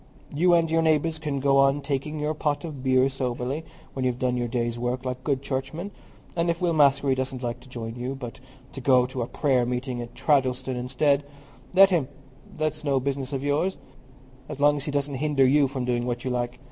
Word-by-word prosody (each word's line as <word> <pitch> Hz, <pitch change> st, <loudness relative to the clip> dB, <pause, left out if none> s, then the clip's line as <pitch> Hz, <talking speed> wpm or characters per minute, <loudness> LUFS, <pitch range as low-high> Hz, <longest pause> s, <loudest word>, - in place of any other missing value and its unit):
You 175 Hz, +4 st, +4 dB
and 165 Hz, -1 st, +2 dB
your 165 Hz, 0 st, +3 dB
neighbours 160 Hz, 0 st, +2 dB
can 150 Hz, -3 st, -2 dB
go 135 Hz, 0 st, +3 dB
on 135 Hz, +1 st, +4 dB
taking 145 Hz, +2 st, -3 dB
your 150 Hz, +1 st, 0 dB
pot 150 Hz, 0 st, -1 dB
of 150 Hz, -5 st, -7 dB
beer 130 Hz, 0 st, +3 dB
soberly, 130 Hz, +2 st, -3 dB, 0.3 s
when 135 Hz, -, -3 dB
you've 125 Hz, -1 st, 0 dB
done 125 Hz, -1 st, 0 dB
your 120 Hz, -1 st, -1 dB
day's 120 Hz, 0 st, -2 dB
work, 125 Hz, +2 st, -2 dB
like 125 Hz, 0 st, -4 dB
good 140 Hz, -2 st, -1 dB
churchmen; 140 Hz, +8 st, -4 dB, 0.4 s
and 170 Hz, 0 st, +1 dB
if 170 Hz, 0 st, 0 dB
Will 175 Hz, -2 st, +1 dB
Maskery 140 Hz, -2 st, +4 dB
doesn't 130 Hz, -1 st, -3 dB
like 120 Hz, +1 st, -3 dB
to 130 Hz, +1 st, -17 dB
join 115 Hz, -2 st, -6 dB
you, 125 Hz, +2 st, -4 dB
but 125 Hz, -2 st, -8 dB, 0.3 s
to 135 Hz, -, -8 dB
go 125 Hz, -1 st, +4 dB
to 130 Hz, 0 st, -4 dB
a 115 Hz, -, -2 dB
prayer 130 Hz, -4 st, +1 dB
meeting 125 Hz, 0 st, -3 dB
at 120 Hz, 0 st, -9 dB
Treddleston 130 Hz, -3 st, +1 dB
instead, 135 Hz, +3 st, +1 dB, 0.5 s
let 195 Hz, +1 st, +8 dB
him; 160 Hz, -8 st, +2 dB, 0.4 s
that's 155 Hz, 0 st, -2 dB
no 140 Hz, -2 st, +2 dB
business 135 Hz, 0 st, -3 dB
of 135 Hz, -1 st, -3 dB
yours, 150 Hz, +7 st, 0 dB, 0.7 s
so -, -, -4 dB
long 145 Hz, +1 st, +4 dB
as 145 Hz, -1 st, -4 dB
he 150 Hz, -, -2 dB
doesn't 140 Hz, 0 st, -1 dB
hinder 145 Hz, -3 st, +3 dB
you 140 Hz, +2 st, +4 dB
from 130 Hz, -2 st, -4 dB
doing 120 Hz, 0 st, 0 dB
what 120 Hz, +1 st, -3 dB
you 130 Hz, -, -1 dB
like. 120 Hz, 0 st, -2 dB
135 Hz, 215 wpm, -25 LUFS, 125-150 Hz, 0.7 s, let